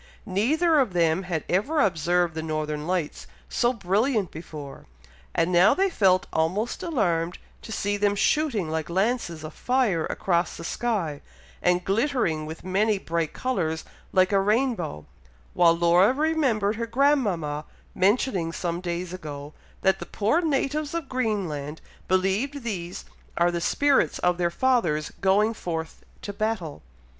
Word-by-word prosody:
Neither 295 Hz, -, +2 dB
of 245 Hz, -9 st, +1 dB
them 165 Hz, 0 st, +2 dB
had 160 Hz, -4 st, -1 dB
ever 265 Hz, -, +1 dB
observed 175 Hz, -, +2 dB
the 160 Hz, -, -4 dB
Northern 155 Hz, -1 st, -3 dB
Lights 175 Hz, -4 st, -2 dB, 0.2 s
so 240 Hz, -, +2 dB
brilliant 210 Hz, -, 0 dB
before, 150 Hz, -3 st, -9 dB, 0.5 s
and 165 Hz, -, +2 dB
now 180 Hz, +2 st, +5 dB
they 390 Hz, 0 st, +2 dB
felt 185 Hz, -, +3 dB
almost 185 Hz, +9 st, 0 dB
alarmed 175 Hz, -, 0 dB, 0.2 s
to -, -, -10 dB
see 205 Hz, -1 st, -1 dB
them 205 Hz, 0 st, +2 dB
shooting 230 Hz, -, +1 dB
like 160 Hz, 0 st, -3 dB
lances 190 Hz, -3 st, -1 dB
of 155 Hz, -, -7 dB
fire 245 Hz, -11 st, +1 dB
across 170 Hz, -2 st, 0 dB
the -, -, -8 dB
sky, 175 Hz, -7 st, -2 dB, 0.4 s
and 180 Hz, 0 st, +2 dB
glittering 195 Hz, -, 0 dB
with 160 Hz, +1 st, -8 dB
many 205 Hz, +3 st, +1 dB
bright 165 Hz, -4 st, -2 dB
colours, 170 Hz, -11 st, -2 dB, 0.3 s
like 185 Hz, +1 st, +3 dB
a 200 Hz, -, +4 dB
rainbow, 210 Hz, -, 0 dB, 0.5 s
while 170 Hz, -1 st, +4 dB
Laura 175 Hz, +5 st, +5 dB
remembered 265 Hz, -9 st, +1 dB
her 230 Hz, 0 st, -3 dB
grandmama 210 Hz, -, +1 dB, 0.3 s
mentioning 190 Hz, -3 st, +1 dB
some 170 Hz, 0 st, -3 dB
days 175 Hz, 0 st, -4 dB
ago, 150 Hz, -4 st, -7 dB, 0.3 s
that 190 Hz, 0 st, +3 dB
the -, -, -7 dB
poor 225 Hz, +12 st, +1 dB
natives 300 Hz, 0 st, -1 dB
of 325 Hz, -5 st, -4 dB
Greenland 185 Hz, -, -2 dB, 0.3 s
believe 195 Hz, +10 st, 0 dB
these 180 Hz, -6 st, -5 dB, 0.3 s
are 175 Hz, 0 st, +3 dB
the 170 Hz, 0 st, -2 dB
spirits 285 Hz, +9 st, +2 dB
of 180 Hz, 0 st, +1 dB
their 175 Hz, -1 st, +2 dB
fathers 170 Hz, -9 st, +1 dB
going 205 Hz, +3 st, +3 dB
forth 165 Hz, -6 st, -5 dB, 0.2 s
to 205 Hz, -, -5 dB
battle. 200 Hz, -7 st, -3 dB
190 Hz, 145 wpm, -25 LUFS, 165-235 Hz, 0.5 s, now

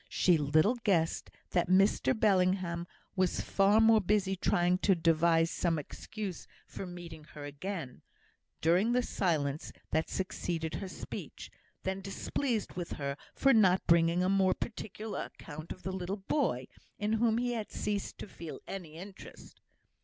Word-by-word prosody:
She 180 Hz, -, +4 dB
little 155 Hz, -, +3 dB
guessed 185 Hz, -8 st, +1 dB, 0.2 s
that 175 Hz, -1 st, +1 dB
Mr 195 Hz, +6 st, +3 dB
Bellingham 185 Hz, -4 st, +2 dB, 0.3 s
was 185 Hz, -2 st, +1 dB
far 200 Hz, +2 st, +3 dB
more 225 Hz, -1 st, +6 dB
busy 195 Hz, 0 st, +1 dB
trying 180 Hz, -1 st, +2 dB
to 195 Hz, -1 st, +4 dB
devise 165 Hz, 0 st, +3 dB
some 170 Hz, -2 st, 0 dB
excuse 195 Hz, +5 st, -6 dB, 0.2 s
for 190 Hz, -, -7 dB
meeting 170 Hz, -3 st, -9 dB
her 145 Hz, -1 st, -7 dB
again, 145 Hz, -1 st, -6 dB, 0.6 s
during 180 Hz, +9 st, +3 dB
the 250 Hz, 0 st, +3 dB
silence 155 Hz, -9 st, -1 dB, 0.2 s
that 160 Hz, 0 st, +1 dB
succeeded 170 Hz, -3 st, -3 dB
her 195 Hz, -, -4 dB
speech, 185 Hz, -, -8 dB, 0.3 s
than 190 Hz, +1 st, -2 dB
displeased 220 Hz, +4 st, -2 dB
with 175 Hz, -1 st, -4 dB
her 140 Hz, -1 st, -3 dB, 0.2 s
for 275 Hz, -1 st, +4 dB
not 190 Hz, -5 st, +4 dB
bringing 170 Hz, +1 st, +4 dB
a -, -, +2 dB
more 190 Hz, -1 st, +3 dB
particular 215 Hz, -1 st, -5 dB
account 155 Hz, +1 st, -9 dB
of 185 Hz, -, -8 dB
the 190 Hz, -, -3 dB
little 190 Hz, +2 st, -3 dB
boy, 195 Hz, -, 0 dB, 0.3 s
in 210 Hz, +1 st, 0 dB
whom 225 Hz, 0 st, +3 dB
he 245 Hz, 0 st, 0 dB
had 220 Hz, -3 st, -4 dB
ceased 205 Hz, -1 st, -3 dB
to -, -, -7 dB
feel 165 Hz, -5 st, -8 dB
any 175 Hz, -5 st, -7 dB
interest. 190 Hz, +3 st, -11 dB
185 Hz, 150 wpm, -32 LUFS, 165-205 Hz, 0.6 s, more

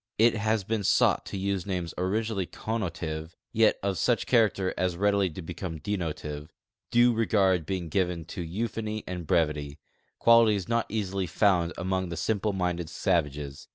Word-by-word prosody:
It 115 Hz, +2 st, +5 dB
has 110 Hz, 0 st, 0 dB
been 110 Hz, +1 st, -2 dB
sought -, -, +3 dB
to -, -, -5 dB
use 100 Hz, 0 st, -2 dB
names 90 Hz, -4 st, -3 dB
originally 100 Hz, +1 st, -1 dB
con 115 Hz, +1 st, -3 dB
notive 80 Hz, -3 st, -4 dB, 0.2 s
yet 110 Hz, -1 st, +4 dB
of 100 Hz, -3 st, -1 dB
such 120 Hz, +5 st, +2 dB
character 105 Hz, -6 st, +2 dB
as 90 Hz, -2 st, -1 dB
readily 100 Hz, -1 st, +2 dB
to 85 Hz, +2 st, -8 dB
become 85 Hz, 0 st, -5 dB
denotive, 75 Hz, -4 st, -4 dB, 0.4 s
due 120 Hz, 0 st, +5 dB
regard 95 Hz, -7 st, +2 dB
l)eing 95 Hz, -3 st, -2 dB
given 90 Hz, -1 st, -1 dB
to 90 Hz, -, -6 dB
euphony 110 Hz, +4 st, -3 dB
and 90 Hz, -3 st, -6 dB
brevity 75 Hz, -4 st, 0 dB, 0.2 s
— -, -, -44 dB
qualities 110 Hz, -5 st, +5 dB
not 115 Hz, 0 st, 0 dB
easily 100 Hz, -3 st, -2 dB
found 85 Hz, -1 st, +2 dB
among 95 Hz, 0 st, -1 dB
the 85 Hz, -, -5 dB
simple 105 Hz, +4 st, 0 dB
minded 90 Hz, -3 st, -2 dB
savages. 75 Hz, -6 st, -1 dB
95 Hz, 160 wpm, -28 LUFS, 85-105 Hz, 0.4 s, It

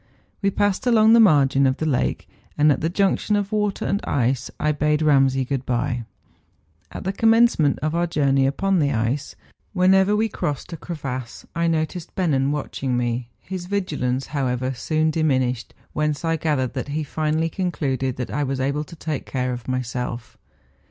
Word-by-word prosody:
We 200 Hz, -, +2 dB
passed 205 Hz, +3 st, 0 dB
along 220 Hz, -2 st, +6 dB
the 230 Hz, -, +7 dB
margin 140 Hz, -9 st, +5 dB
of 130 Hz, +1 st, 0 dB
the 160 Hz, -, -2 dB
lake, 130 Hz, -5 st, 0 dB, 0.3 s
and 150 Hz, 0 st, +5 dB
at 135 Hz, -, 0 dB
the 160 Hz, -, 0 dB
junction 200 Hz, +3 st, +1 dB
of 205 Hz, 0 st, -1 dB
water 210 Hz, -2 st, -1 dB
and 200 Hz, -, -1 dB
ice 130 Hz, 0 st, 0 dB
I 150 Hz, -, +2 dB
bade 150 Hz, +1 st, +1 dB
Eamsay 135 Hz, -3 st, +3 dB
good 135 Hz, -2 st, -2 dB
bye. 120 Hz, -1 st, -1 dB, 0.9 s
At -, -, -7 dB
the 190 Hz, -, -2 dB
commencement 225 Hz, -9 st, +4 dB
of 155 Hz, 0 st, 0 dB
our 170 Hz, +1 st, +1 dB
journey 140 Hz, -4 st, +2 dB
upon 190 Hz, +7 st, +1 dB
the 145 Hz, -2 st, +2 dB
ice, 120 Hz, +6 st, -1 dB, 0.4 s
whenever 190 Hz, +2 st, +4 dB
we 220 Hz, +1 st, +2 dB
crossed 150 Hz, -5 st, -4 dB
a -, -, -3 dB
cre¬ 170 Hz, +1 st, -6 dB
vasse, 130 Hz, -3 st, -6 dB
I 170 Hz, 0 st, +1 dB
noticed 160 Hz, +1 st, -2 dB
Bennen 140 Hz, -7 st, +1 dB
watching 135 Hz, -3 st, -2 dB
me; 120 Hz, 0 st, -2 dB
his 185 Hz, -1 st, -6 dB
vigilance, 135 Hz, -10 st, -1 dB
however, 130 Hz, -2 st, -1 dB
soon 155 Hz, +5 st, 0 dB
diminished, 130 Hz, -6 st, 0 dB, 0.2 s
whence 150 Hz, +1 st, -1 dB
I 165 Hz, 0 st, +1 dB
gathered 145 Hz, -6 st, -1 dB
that 130 Hz, 0 st, -4 dB
he 150 Hz, +2 st, -2 dB
finally 155 Hz, +2 st, -1 dB
concluded 135 Hz, -8 st, -2 dB
that 125 Hz, -, -5 dB
I 145 Hz, -, -1 dB
was 135 Hz, -1 st, -2 dB
able 140 Hz, +3 st, 0 dB
to 170 Hz, -, -12 dB
take 155 Hz, -3 st, -4 dB
care 125 Hz, -1 st, -1 dB
of 120 Hz, -1 st, -8 dB
myself. 125 Hz, -2 st, -4 dB
150 Hz, 180 wpm, -22 LUFS, 130-175 Hz, 0.9 s, the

